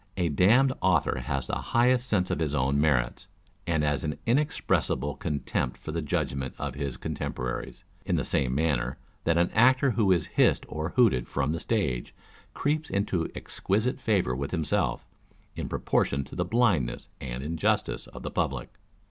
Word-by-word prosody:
A 90 -2 +1
damned 115 - +4
author 90 -5 +2
has 70 -2 -2
the - - -5 0.2
highest 125 +1 +3
sense 90 -3 +1
of - - -1
his 75 -3 0
own 70 +1 +2
merits, 65 -6 +1 0.4
and 80 -3 +1
an 75 0 -1
inexpressible 115 - +1
con 75 -2 -3
tempt - - -2
for - - -7
the 85 +1 -2
judgment 65 -3 -2
of 70 -2 -3
his 70 -2 -4
contemporaries; 60 -1 -4 0.2
in - - 0
the - - 0
same 65 -1 0
manner 70 -5 0 0.3
that 85 0 +3
an 85 +1 +2
actor 130 +4 +5
who 110 -5 +2
is 85 -4 +3
hissed - - +2
or 80 +2 -3
hooted 110 - +4
from 70 +1 -1
the 85 - -2
stage, 80 - -1 0.4
creeps 155 +2 0
into 100 -4 0
exquisite 110 +8 -1
favour 95 - +1
with 70 +2 -3
himself, 80 -4 0 0.5
in - - -4
proportion 70 0 0
to - - -11
the 90 - 0
blindness 95 - +1
and 65 -1 -5
injustice 80 +2 0
of - - -10
the - - -4
public. - - -2
80 Hz, 165 wpm, -28 LUFS, 70-105 Hz, 0.5 s, actor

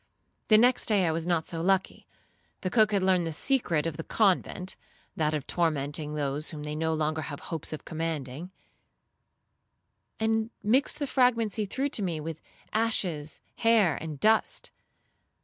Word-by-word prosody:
The 215 - +7
next 245 +3 +4
day 205 -4 +3
I 165 - +2
was 165 +1 -2
not 170 -3 +1
so 165 -1 -4
lucky; 190 +1 0 0.5
the 185 - -2
cook 215 -2 +4
had 200 -2 +1
learned 185 -3 +2
the - - -2
secret 170 - +2
of 165 -3 -3
the 160 - -5
convent, 190 -2 +1 0.4
(that 155 -1 0
of 145 -3 -4
tormenting 150 -2 -1
those 145 +1 -1
whom 150 -2 -7
they 150 0 -4
no 160 +1 -1
longer 155 0 -1
have 145 -2 -6
hopes 165 -2 -5
of 155 - -7
commanding), 160 -1 -4 1.7
and 220 0 +1
mixed 255 +7 +3
the 290 - -1
fragments 240 -6 +2
he 215 - 0
threw 270 +7 -1
to 250 - -1
me, 175 -5 -2
with 160 +1 -6 0.3
ashes, 180 -9 -1 0.2
hair, 220 -9 +4
and 155 -3 -6
dust. 220 +5 +2
170 Hz, 165 wpm, -28 LUFS, 155-215 Hz, 1.7 s, The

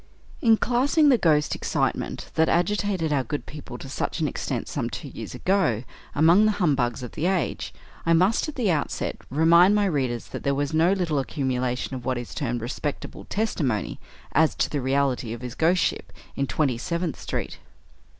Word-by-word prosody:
In 225 -2 +5
classing 275 +7 +3
the 255 - +6
ghost 150 -3 +3
excitement - - -2
that 160 0 +3
agitated 185 -2 +1
our 135 -2 +1
good 145 +5 -4
people 145 -5 -9
to 135 - -9
such 140 - -3
an 155 - +1
extent - - -3
some - - -2
two - - -6
years - - -8
ago 185 - +1 0.3
among 170 +8 +5
the 215 - +3
"humbugs" 135 - 0
of 125 - -6
the 160 - -1
age, 185 -2 -1 0.3
I 165 - +3
must, 185 - +3
at 305 - -8
the 225 -8 +1
outset, 150 -3 -2
remind 170 +7 +5
my 205 -1 +3
readers 130 - -1
that - - -6
there 140 0 0
was 145 +2 -1
no 165 +3 +4
little 170 -7 0
accumulation 130 -2 -2
of 130 -2 -5
what 130 0 -1
is 120 -1 -6
termed 120 -5 -2
"respectable" 140 +5 -5
testimony, 150 - -1 0.3
as 160 +1 +3
to - - 0
the 145 - -1
reality 130 -3 0
of 120 - -8
his 125 -2 -6
ghostship 170 +6 +1 0.2
in 140 - -1
Twenty 135 -6 0
seventh 170 +1 -2
street. - - -4
155 Hz, 180 wpm, -25 LUFS, 130-185 Hz, 0.3 s, the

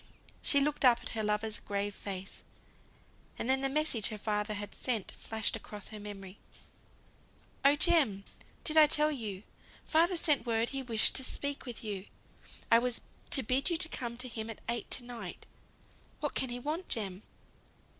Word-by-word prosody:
She 280 - +5
looked 295 +1 0
up 245 -2 +6
at - - -5
her 220 - -2
lover's 210 0 0
grave 200 0 -2
face; 195 -1 -7 0.9
and - - -3
then 265 0 +3
the 270 - +2
message 275 -7 +1
her 215 - -5
father 210 0 -1
had 205 0 -5
sent 230 -6 -2
flashed 220 -3 -3
across 205 -2 -7
her 215 - -8
memory. 200 -2 -9 1.2
"Oh, 280 +1 +6
Jem, 295 - +3 0.4
did 315 -1 +2
I 305 -1 +9
tell 300 0 +5
you? 215 -8 -5 0.4
Father 340 +3 +3
sent 300 -4 +2
word 230 0 +1
he 270 -1 -3
wished 230 -4 +4
to 265 - +1
speak 280 +1 -1
with 240 0 -6
you. 205 -2 -4 0.6
I 230 - +8
was 245 0 +1 0.3
to 265 - +6
bid 260 +8 +2
you 340 - 0
come 255 -9 -1
to 250 +1 -3
him 225 -2 -4
at 225 - -8
eight 235 0 -2
to 245 - +3
night. 230 -7 -8 0.7
What 295 - -2
can 260 - 0
he 240 - -3
want, 305 +8 -4
Jem?" 195 -4 -3
235 Hz, 175 wpm, -32 LUFS, 210-280 Hz, 1.2 s, I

